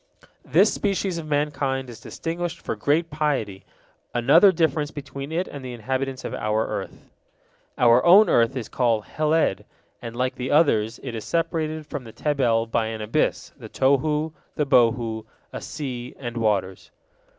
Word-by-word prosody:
This - - +4
species 195 -3 -1
of 155 - -7
mankind 140 -3 -1
is 120 -3 -10
distinguished 170 +6 -4
for - - -4
great 160 +3 0
piety, 140 -11 -2 0.5
another 145 - +6
difference 160 -4 0
between 140 -1 -7
it 175 +3 -1
and 140 -2 -8
the 125 -1 -6
inhabitants 130 +3 -3
of - - -4
our 105 +1 0
earth. - - -6 0.7
Our 120 0 +5
own 195 +5 +7
earth 115 +3 +3
is 115 - -4
called 115 -4 +1
Heled, 155 -8 +1 0.4
and, 115 0 -7
like 130 +1 0
the 125 +1 -5
others, 115 -8 +2
it 130 -3 -5
is 110 -2 -5
separated 160 -2 -2
from 145 -3 -6
the 115 - -11
Tebel 125 -7 +1
by 115 -1 0
an 110 -1 -5
abyss, 105 +1 -1
the - - -10
Tohu, 150 +4 +1 0.2
the 150 - 0
Bohu, 115 -4 +2 0.3
a - - -5
sea, 125 -5 -6
and 120 -3 -6
waters. 100 -5 -1
135 Hz, 160 wpm, -24 LUFS, 115-155 Hz, 0.7 s, own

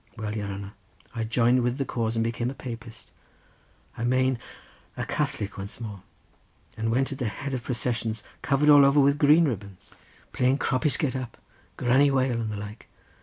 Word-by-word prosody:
Well, 105 -1 -4
your 105 -2 -3
hanner, 100 +1 -6 0.4
I 115 -2 -2
joined 120 +2 +3
with 120 +1 0
the 135 - -1
cause 115 -2 -2
and 115 - +1
became 115 +1 -1
a 135 - -6
Papist, 120 -2 -9 0.8
I 115 - -5
mane 130 0 +2 0.6
a - - -2
Catholic 100 -1 -2
once 100 +3 -7
more, 105 -5 -7 0.7
and 110 +1 -2
went 130 +4 +1
at 135 - -6
the 125 - -1
head 135 +5 -5
of 130 - -2
processions, 115 -3 -2 0.2
covered 145 +2 +4
all 145 -1 +9
over 140 +1 +5
with 140 +1 +4
green 155 +3 +6
ribbons, 100 -8 -5 0.4
playing 130 +2 +2
'Croppies 135 0 +1
Get 135 -4 -1
Up,' 130 -3 -5 0.4
'Granny 130 +3 +4
Whale,' 130 -3 +1
and 110 - -2
the 105 - -4
like. 105 +2 -8
120 Hz, 180 wpm, -26 LUFS, 110-135 Hz, 0.8 s, all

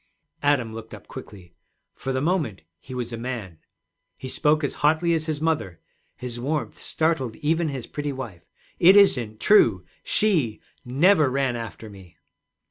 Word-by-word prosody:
Adam 135 -6 +1
looked 110 0 -8
up - - -15
quickly. 90 -3 -11 0.4
For 135 - -5
the 130 0 -1
moment 155 - -1 0.2
he 130 +6 -9
was 120 -1 -4
a - - -4
man. 115 -9 -5 0.6
He 130 - -7
spoke 150 +3 +2
as 140 - -1
hotly 160 +3 +3
as 160 -1 -1
his 155 -2 -2
mother; 150 - -1 0.4
his 120 -1 -6
warmth 145 +4 -3
startled 155 -8 -1
even 160 +2 0
his 135 -5 -4
pretty 145 -1 -4
wife. 120 -11 -7 0.4
'It 185 +3 +7
isn't 120 - +4
true; 110 - +4 0.2
she 155 - +1 0.2
never 155 +4 +4
ran 135 -1 0
after 115 -2 -7
me.' 95 -4 -14
130 Hz, 155 wpm, -24 LUFS, 115-155 Hz, 0.6 s, It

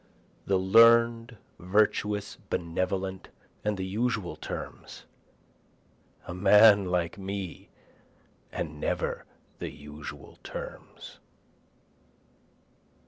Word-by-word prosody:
The 95 - +3
learn'd, 115 +4 +5 0.2
virtuous, 105 +2 +1
benevolent, 95 +2 -2 0.3
and 105 -1 -1
the 95 - -3
usual 105 -4 -2
terms, 75 - -8 1.2
A - - -6
man 100 +2 +6
like 90 0 -1
me 95 -2 -6 0.8
and 75 -2 -5
never - - -2 0.3
the - - -4
usual 75 +1 -10
terms. - - -9
95 Hz, 80 wpm, -28 LUFS, 90-105 Hz, 1.2 s, man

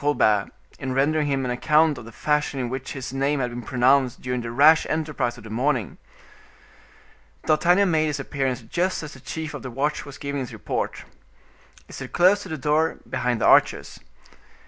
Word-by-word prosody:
Colbert, 110 -9 +2 0.3
in 130 -1 -3
rendering 150 +2 +2
him 135 -2 0
an 125 - -2
account 150 +5 +3
of 115 - -10
the 115 - -11
fashion 150 +2 -1
in 125 -2 -2
which 130 +1 -5
his 135 -1 -6
name 140 +2 0
had 125 -2 -1
been 120 +1 -6
pronounced 130 +1 +2
during 125 -1 -3
the 115 - -5
rash 150 +7 +5
enterprise 150 -6 -2
of 120 - -13
the 110 - -10
morning. 120 - -1 1.5
D'Artagnan 175 +5 +3
made 155 -1 +2
his 150 -1 -2
appearance 135 -3 -2
just 175 +10 -1
as 150 - -8
the 130 - -13
chief 160 +3 -6
of 145 - -6
the 130 - -6
watch 140 +5 -2
was 145 -1 -10
giving 140 0 -4
his 125 - -6
report. - - -4 0.8
He - - -15
stood - - -8
close 185 +4 +4
to 190 - -9
the 160 - -4
door, 150 +4 +1
behind 120 -1 -1
the - - +2
archers. - - +3
140 Hz, 190 wpm, -24 LUFS, 125-155 Hz, 1.5 s, rash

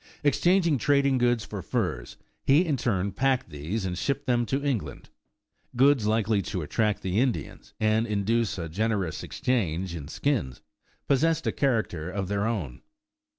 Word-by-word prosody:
Exchanging 170 +1 +3
trading 140 0 +3
goods 120 -2 +2
for 100 -3 -6
furs, 90 - -3 0.3
he 145 +7 +4
in 155 -4 +1
turn 100 -6 0
packed 130 -1 0
these 80 +9 -3
and 90 -1 -2
shipped 140 +9 -2
them 120 -2 +1
to 140 +2 -1
England. 100 - -3 0.6
Goods 130 -3 +4
likely 110 -1 +2
to 95 -4 -4
attract 105 +6 0
the 95 +3 0
Indians, 120 - -2
and 110 +1 +2
induce 105 +1 0
a 85 -2 -4
generous 100 0 -1
exchange 95 -8 -1
in 75 -4 -7
skins, 90 - -2 0.4
possessed 160 +4 +2
a - - +1
character 110 - -1
of 95 0 -3
their 100 +1 0
own. 95 - -3
110 Hz, 150 wpm, -27 LUFS, 95-130 Hz, 0.6 s, he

